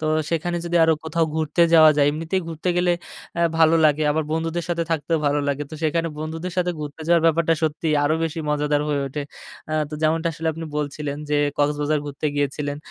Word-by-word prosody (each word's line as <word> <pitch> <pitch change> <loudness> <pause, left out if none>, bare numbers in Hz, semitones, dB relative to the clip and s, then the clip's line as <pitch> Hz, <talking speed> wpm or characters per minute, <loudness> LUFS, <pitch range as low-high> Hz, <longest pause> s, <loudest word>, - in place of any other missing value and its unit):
তো 155 - -4 0.3
সেখানে 175 +1 -1
যদি 170 0 0
আরো 160 - +4
কোথাও 165 +1 +1
ঘুরতে 160 +2 +1
যাওয়া 155 -1 +8
যায় 145 -1 +4
এমনিতেই 165 +5 -2
ঘুরতে 165 +2 -4
গেলে 175 0 +3 0.5
আ - - +1 0.2
ভালো 160 0 +5
লাগে। 150 0 +3
আবার 155 +1 0
বন্ধুদের 165 +1 -2
সাথে 170 -1 0
থাকতেও 160 +1 0
ভালো 145 +1 +2
লাগে। 140 +1 -1
তো - - -7
সেখানে 165 +2 0
বন্ধুদের 165 +3 -5
সাথে 180 0 +1
ঘুরতে 150 +1 -7
যাওয়ার 170 -1 +4
ব্যাপারটা 165 0 +3
সত্যিই 155 0 0
আরো 155 - +2
বেশি 165 0 -4
মজাদার 150 0 +1
হয়ে 145 -1 0
ওঠে। 145 +2 -4 0.5
আ - - -2 0.2
তো - - -5
যেমনটা 160 +2 +2
আসলে 160 +1 -3
আপনি 165 +1 -7
বলছিলেন 145 0 -3
যে, 150 - +2 0.2
কক্সবাজার 145 +1 +1
ঘুরতে 145 +2 -4
গিয়েছিলেন। 145 0 -2
155 Hz, 200 wpm, -22 LUFS, 150-165 Hz, 0.5 s, যাওয়া